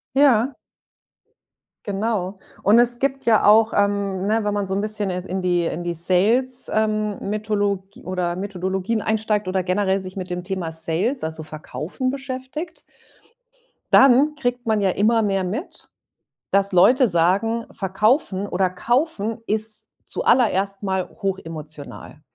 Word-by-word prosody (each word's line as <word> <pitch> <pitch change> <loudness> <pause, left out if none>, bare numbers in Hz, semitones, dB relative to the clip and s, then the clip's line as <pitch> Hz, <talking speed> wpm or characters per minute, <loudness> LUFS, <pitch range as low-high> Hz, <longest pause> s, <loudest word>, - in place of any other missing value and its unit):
Ja. 270 -2 +4 1.3
Genau. 200 -2 -2 0.2
Und 210 +3 +5
es 240 0 +3
gibt 270 0 -2
ja 225 -2 +4
auch, 220 +2 +5
ähm, 200 -2 0
ne, 220 +2 +1
wenn 205 0 -1
man 205 -1 -1
so 190 - -1
'n 200 - 0
bisschen 210 -2 -1
jetzt 180 0 -4
in 185 +1 -3
die 175 -2 +1
in 175 +1 -3
die 175 - -1
Sales, 210 +10 +2
ähm 215 -1 0
Metholo 205 -2 -1 0.2
oder 180 -1 -2
Methodologien 190 +2 -2
einsteigt 215 -2 0
oder 185 0 0
generell 190 +1 0
sich 185 0 -9
mit 185 -1 -5
dem 180 0 -3
Thema 180 -4 -4
Sales, 165 - -1
also, 160 0 -4
verkaufen 155 - -4
beschäftigt 270 +5 -6 1.1
dann 275 +3 +6
kriegt 245 -2 -2
man 220 -2 +1
ja 195 -2 +2
immer 220 +4 +2
mehr 195 -2 0
mit, 220 - -6 0.6
dass 200 0 +3
Leute 245 +8 +5
sagen: 200 +7 +1
„Verkaufen 200 - 0
oder 185 0 0
kaufen 230 - -1
ist 215 0 -2 0.2
zuallererst 200 -5 +1
mal 190 -2 -1
hochemotional." 160 -6 -6
200 Hz, 140 wpm, -22 LUFS, 185-225 Hz, 1.3 s, dann